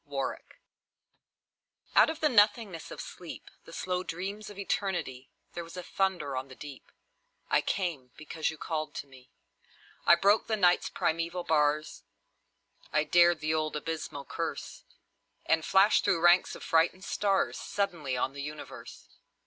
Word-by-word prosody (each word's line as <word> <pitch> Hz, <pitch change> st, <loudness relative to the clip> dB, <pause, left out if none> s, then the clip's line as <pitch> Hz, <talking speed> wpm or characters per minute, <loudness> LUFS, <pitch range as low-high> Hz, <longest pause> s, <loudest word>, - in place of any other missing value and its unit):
The -, -, -35 dB
Call -, -, -2 dB, 1.6 s
Out -, -, +7 dB
of 320 Hz, 0 st, -5 dB
the 310 Hz, -, +5 dB
nothingness 205 Hz, -, +2 dB
of -, -, -9 dB
sleep, -, -, -9 dB
The -, -, -12 dB
slow 180 Hz, 0 st, -2 dB
dreams 195 Hz, +4 st, -5 dB
of 205 Hz, -, -11 dB
Eternity, 185 Hz, -10 st, -2 dB, 0.2 s
There 170 Hz, -, -5 dB
was 165 Hz, +2 st, -11 dB
a 180 Hz, -, -5 dB
thunder 175 Hz, -8 st, -1 dB
on 130 Hz, +1 st, -3 dB
the 130 Hz, -, -12 dB
deep: 140 Hz, -2 st, -11 dB, 0.6 s
I -, -, +4 dB
came, 165 Hz, -10 st, -2 dB
because 155 Hz, +1 st, -3 dB
you 160 Hz, -, -7 dB
called 155 Hz, 0 st, -4 dB
to -, -, -5 dB
me. 130 Hz, -2 st, -17 dB, 0.8 s
I 170 Hz, -, +9 dB
broke 200 Hz, +5 st, +3 dB
the 220 Hz, -, +1 dB
Night's 180 Hz, -3 st, +3 dB
primeval 165 Hz, +2 st, -1 dB
bars, 150 Hz, -1 st, +1 dB, 0.9 s
I 155 Hz, 0 st, +3 dB
dared 175 Hz, 0 st, +4 dB
the 155 Hz, +1 st, 0 dB
old 155 Hz, -1 st, -1 dB
abysmal 150 Hz, -2 st, -4 dB
curse, -, -, -5 dB, 0.6 s
And 160 Hz, 0 st, +2 dB
flashed 195 Hz, +5 st, +4 dB
through 170 Hz, -, +2 dB
ranks 175 Hz, +2 st, +4 dB
of -, -, -10 dB
frightened 165 Hz, +3 st, +2 dB
stars 195 Hz, -2 st, 0 dB
Suddenly 165 Hz, -10 st, -2 dB
on 130 Hz, +2 st, -1 dB
the 140 Hz, -, -6 dB
universe! 150 Hz, +1 st, -9 dB
165 Hz, 155 wpm, -30 LUFS, 150-190 Hz, 1.6 s, I